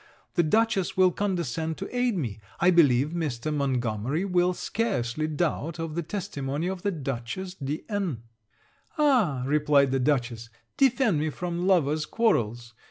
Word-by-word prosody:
The 175 - +3
Dutchess 195 +1 +1
will 185 -1 +5
condescend 165 - -2
to 195 +6 -7
aid 245 -4 +1
me. 115 - -3 0.2
I 180 - +5
believe 145 -5 +4
Mr. 155 -4 -3
Montgomery 130 - -1
will 180 -1 +2
scarcely 155 - -1
doubt 155 0 -2
of 165 -2 -4
the 170 - -1
testimony 160 -5 -4
of 185 0 -3
the 205 - 0
Dutchess 140 +3 -4
de 145 -3 -4
N 190 - -2 0.4
.' - - -35
'Ah,' 235 - +3
replied 145 -1 +3
the 135 - +1
Dutchess, 120 -4 -1 0.3
'defend 255 - +3
me 155 +1 0
from 175 +3 -3
lovers' 155 -5 +2
quarrels! 120 - 0
160 Hz, 150 wpm, -26 LUFS, 135-190 Hz, 0.4 s, will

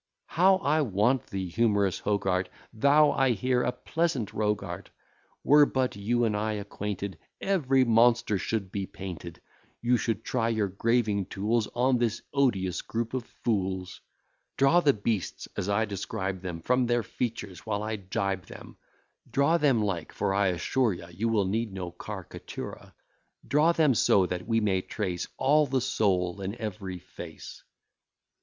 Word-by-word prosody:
How 185 +5 +4
I 155 -5 +1
want 120 +1 +1
thee, 95 -1 -4
humorous 100 0 +1
Hogarth! 95 -3 0 0.3
Thou, 145 +6 +5
I 135 -2 +2
hear, 125 +4 +1
a 125 - +1
pleasant 160 - -2
rogue 105 -1 0
art. 90 +1 -7 0.5
Were 145 0 +6
but 130 -4 0
you 120 +4 0
and 110 -2 +1
I 110 +1 -1
acquainted, 100 -3 -5 0.2
Every 135 -9 +2
monster 115 -2 +4
should 100 -3 -2
be 100 -2 -3
painted: 85 -3 -8 0.4
You 120 +1 +2
should 115 -2 -2
try 115 -3 0
your 110 -3 0
graving 105 -1 +1
tools 105 +2 0
On 125 +1 +3
this 115 -2 -1
odious 100 -10 +1
group 115 +1 -3
of 130 -3 -2 0.2
fools; 95 -4 -1 0.6
Draw 135 +6 +5
the 150 -5 +4
beasts 105 -4 -2
as 95 - -2
I 105 +2 +2
describe 95 -2 -4
them: 90 -3 -5
Form 125 +5 +2
their 120 -1 +1
features 105 -7 -4
while 105 -1 -3
I 110 0 -2
gibe 95 -1 -3
them; - - -11 0.5
Draw 160 +5 +3
them 135 -8 +3
like; 95 -6 -2
for 95 - 0
I 100 0 +2
assure 105 +6 +1
you, 85 -1 -8
You 110 +7 -1
will 105 -3 +2
need 110 +3 -1
no 90 -2 -5
car'catura; - - -8 0.5
Draw 150 +6 +4
them 155 -5 +4
so 100 -3 +4
that 90 +1 -4
we 115 -1 +2
may 95 -3 +1
trace 90 -3 -3
All 150 +3 +4
the 130 0 +1
soul 95 -6 0
in 95 +3 -3
every 105 -5 -5
face. 85 -2 -10
110 Hz, 160 wpm, -28 LUFS, 95-125 Hz, 0.6 s, Were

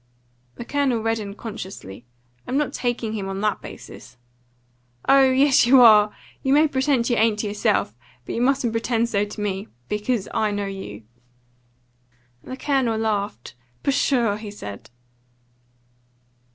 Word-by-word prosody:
The 240 - -8
Colonel 265 -5 0
reddened 215 -3 -2
consciously. 185 - -8 0.4
"I'm 260 - -1
not 295 -1 -1
taking 240 -3 -2
him 195 -3 -4
on 195 0 -4
that 210 0 0
basis." - - -11 0.9
"Oh 270 -1 +6
yes, 265 -1 +4
you 260 +1 +7
are! 210 -3 +7 0.3
You 265 - +1
may 305 +2 +5
pretend 265 -3 +1
you 240 - +1
ain't 220 -1 +3
to 210 - -2
yourself, 205 - 0 0.3
but - - -5
you 235 - -2
mustn't 260 -2 +2
pretend 230 0 0
so 205 -2 +1
to 210 +1 -10
me. 200 0 -3 0.2
Because 210 0 -1
I 215 - +1
know 205 0 -2
you." 190 - -7 1.4
The 260 - -7
Colonel 265 -6 0
laughed. 205 - -2 0.3
"Pshaw!" 245 -6 +1
he 215 -1 -8
said. 105 - -9
225 Hz, 140 wpm, -23 LUFS, 205-255 Hz, 1.4 s, you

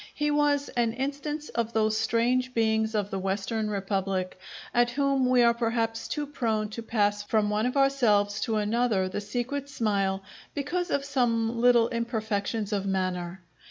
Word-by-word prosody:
He 295 0 0
was 290 -1 +2
an 235 -3 0
instance 285 +4 -4
of 230 -1 -2
those 220 -1 +2
strange 240 +3 +1
beings 220 -1 +1
of 205 -1 -1
the 195 - -2
Western 200 +3 -2
republic, 195 -2 -2 0.3
at 240 0 +3
whom 275 0 +1
we 250 -1 +5
are 235 0 +5
perhaps 230 -1 -1
too 295 -1 -2
prone 225 -7 -1
to 225 +2 -6
pass 205 -2 +1
from 210 0 +1
one 215 +3 +1
of 250 - -2
ourselves 220 -7 +3
to 225 - 0
another 215 -2 +1
the 185 +2 -4
secret 245 +7 -3
smile, 200 -6 0 0.3
because 345 +6 -2
of 280 -3 0
some 235 -4 0
little 240 -2 +5
imperfections 220 -2 -2
of 200 -1 -1
manner. 185 -1 -2
225 Hz, 160 wpm, -27 LUFS, 205-255 Hz, 0.3 s, we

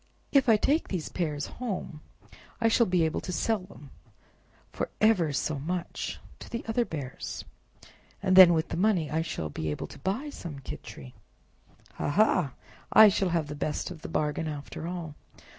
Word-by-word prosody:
"If 275 -3 +4
I 220 - +7
take 295 +9 +1
these 180 -5 -3
pears 150 -5 -2
home 200 -10 -5 0.6
I 230 - +3
shall 235 +1 +4
be 180 -2 +2
able 160 - -1
to - - -5
sell 220 +4 +1
them 180 -7 -14 0.8
for - - -3
ever 205 -8 +4
so 145 +1 -1
much 175 +4 -4 0.2
to - - -10
the 235 - -5
other 235 +2 +1
bears, 140 - -6 0.7
and 190 -1 +2
then 180 -2 +10
with 160 +1 -1
the - - -3
money 180 -5 +2
I 160 +1 +1
shall 80 - -4
be 80 +1 -3
able 75 - -3
to - - -12
buy 235 +10 -2
some 165 - -7
Khichri. 65 - -9 0.8
Ha, - - -1
ha! 180 - +3 0.4
I 220 -1 +9
shall 195 -1 +1
have 165 -2 0
the 145 - -6
best 150 +4 -3
of 165 -4 -9
the - - -7
bargain 150 +1 -1
after 150 +2 -6
all!" 170 -4 -5
170 Hz, 175 wpm, -28 LUFS, 150-205 Hz, 0.8 s, then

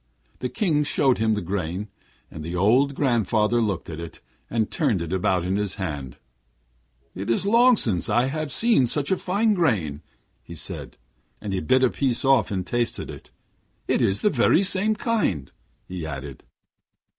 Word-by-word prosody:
The - - -3
King 160 -9 +1
showed 135 -4 +2
him 110 -1 +2
the 105 - -3
grain, 95 +2 -3 0.4
and 80 - -8
the 85 +3 -5
old 125 +10 +3
grandfather 120 -3 +1
looked 100 -5 -2
at 80 -1 -7
it, 85 -1 -8 0.3
and 110 -2 -1
turned 135 - +1
it 85 +1 -4
about 90 -1 +1
in 95 +2 0
his 105 -2 -2
hand. 75 -9 -5 1.0
'It 95 +4 -6
is 115 +11 +1
long 235 +3 +5
since 95 - 0
I 120 +2 +2 0.2
saw 215 - +3
such 140 +6 +1
a 190 - +3
fine 210 +4 +1
grain,' 100 - 0 0.5
said - - -7
he, - - -42
and 100 -2 -5
he 95 - 0
bit 130 +6 +2
a 130 - +4
piece 130 -2 -1
off 130 -9 +4
and 95 -3 -3
tasted 120 +3 -2
it. - - -12 0.6
'It's 95 - +1
the 210 - +3
very 145 +7 +3
same 200 +3 +1
kind,' 210 - -1 0.4
he 90 -2 -6
added. 70 -3 -7
110 Hz, 170 wpm, -24 LUFS, 90-145 Hz, 1.0 s, long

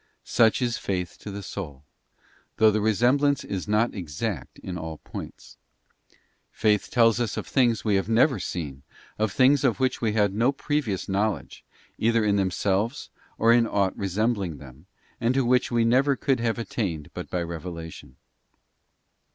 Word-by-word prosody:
Such 115 +2 +3
is 120 -1 -1
faith 90 -3 -3
to - - -8
the 100 0 -6
soul, 75 -9 -7 0.7
though 110 -1 +6
the 105 0 0
resemblance 125 +7 +2
is 95 0 -4
not 105 +3 +2
exact 85 - -5
in 90 - -7
all 80 -2 -6
points; - - -10 0.9
faith 105 -1 +1
tells 115 -2 +4
us 115 -4 -2
of - - -3
things 120 -5 +1
we 105 - +2
have 95 - -2
never 120 +2 +3
seen, 75 -7 -5 0.4
of 110 -1 +1
things 135 +4 +4
of 130 -3 +2
which 130 -1 0
we 110 -3 +1
had 105 -3 +2
no 115 +6 +2
previous 140 -8 -2
knowledge, 100 +2 -2 0.4
either 115 0 +2
in 100 -1 +2
themselves 100 +4 -1 0.3
or 115 +1 +5
in 120 -1 +4
aught 100 -3 0
resembling 100 -3 -1
them, 70 +4 -14 0.3
and 120 +2 +1
to 135 -2 +2
which 125 +1 +2
we 120 -1 +2
never 135 +4 +3
could 135 -1 0
have 115 0 0
attained 95 -9 -3
but - - -7
by 90 -1 -1
revelation. 85 -4 -8
110 Hz, 160 wpm, -25 LUFS, 95-120 Hz, 0.9 s, though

